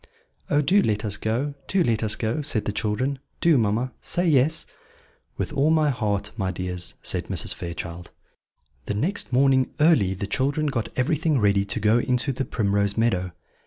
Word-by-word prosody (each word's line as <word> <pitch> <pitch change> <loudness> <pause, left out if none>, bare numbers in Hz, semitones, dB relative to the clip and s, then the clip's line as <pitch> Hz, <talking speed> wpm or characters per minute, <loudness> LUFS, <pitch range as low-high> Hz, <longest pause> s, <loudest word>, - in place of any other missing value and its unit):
"Oh, 145 +1 +3
do 190 +8 +4
let 105 - 0
us 105 -1 -1
go! 120 +8 -2
do 190 -2 +2
let 115 -7 0
us 110 -2 +2
go!" 115 +6 -2
said 130 -7 -1
the - - -1
children; 110 +7 -2 0.2
"do, 170 -2 +4
mamma, 115 +4 0
say 175 +1 0
yes." 155 +1 +2 0.7
"With - - -3
all 145 +1 +2
my 155 -2 +3
heart, 105 -4 -2
my 95 -4 -2
dears," 90 -1 -4
said - - -1
Mrs. - - +1
Fairchild. 85 0 -7 0.8
The 105 - -2
next 170 - -2
morning 130 0 +3
early 145 - +4
the 100 - -4
children 140 +9 0
got 125 -6 -2
everything 155 +3 +1
ready 100 -2 +2
to 100 +3 -1
go 110 +3 +3
into 125 +3 0
the 135 +1 -3
Primrose 100 -2 0
Meadow. 95 -6 +1
120 Hz, 175 wpm, -24 LUFS, 100-145 Hz, 0.8 s, do